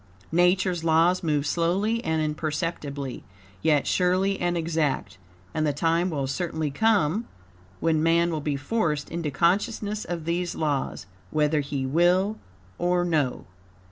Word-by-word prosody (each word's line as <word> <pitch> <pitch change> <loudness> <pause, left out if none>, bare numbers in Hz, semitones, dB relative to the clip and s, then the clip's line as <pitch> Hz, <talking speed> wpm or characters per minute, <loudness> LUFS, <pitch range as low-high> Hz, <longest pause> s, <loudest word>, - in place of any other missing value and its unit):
Nature's 180 0 +2
laws 165 +3 +3
move 150 -4 0
slowly 190 +9 0
and 160 -1 0
imperceptibly, 150 -3 -3 0.4
yet 150 -3 +3
surely 185 +2 +1
and 175 0 +1
exact, 160 - -1 0.3
and 155 - 0
the - - +2
time 165 +4 +1
will 145 -5 -2
certainly 155 +1 -2
come 210 +2 +2 0.6
when 160 -1 +2
man 170 +1 +3
will 155 -2 -2
be 145 -1 -1
forced 150 -2 -1
into 165 -2 -2
consciousness 205 - 0
of 170 -3 -5
these 175 +1 -1
laws, 145 -9 -2 0.2
whether 150 0 +2
he 140 -1 -2
will 180 +8 +2 0.4
or 175 0 +2
no. 155 -7 0
165 Hz, 135 wpm, -26 LUFS, 150-180 Hz, 0.6 s, laws